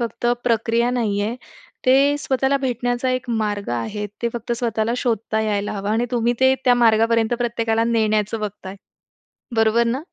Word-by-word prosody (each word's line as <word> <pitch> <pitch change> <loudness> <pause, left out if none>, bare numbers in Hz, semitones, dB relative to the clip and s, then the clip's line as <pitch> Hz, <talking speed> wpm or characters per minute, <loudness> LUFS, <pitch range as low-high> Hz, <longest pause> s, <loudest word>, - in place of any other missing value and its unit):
फक्त 235 0 -3 0.2
प्रक्रिया 230 +1 +1
नाहीये. 220 -3 -1 0.5
ते 275 +3 +4
स्वतःला 270 -1 +1
भेटण्याचा 245 0 -1
एक 255 -1 -2
मार्ग 210 -3 -2
आहे. 120 - -3 0.2
ते 235 - +1
फक्त 240 0 -4
स्वतःला 230 -1 -1
शोधता 225 -3 -1
यायला 205 -2 -1
हवं 200 0 -4
आणि 225 +2 +1
तुम्ही 240 -1 +1
ते 260 0 +5
त्या 250 -1 +5
मार्गापर्यंत 230 0 +3
प्रत्येकाला 230 -2 0
नेण्याचं 220 -1 0
बघताय. 200 -2 -6 0.8
बरोबर 225 +1 +3
ना? 245 +4 -1
230 Hz, 150 wpm, -21 LUFS, 215-245 Hz, 0.8 s, ते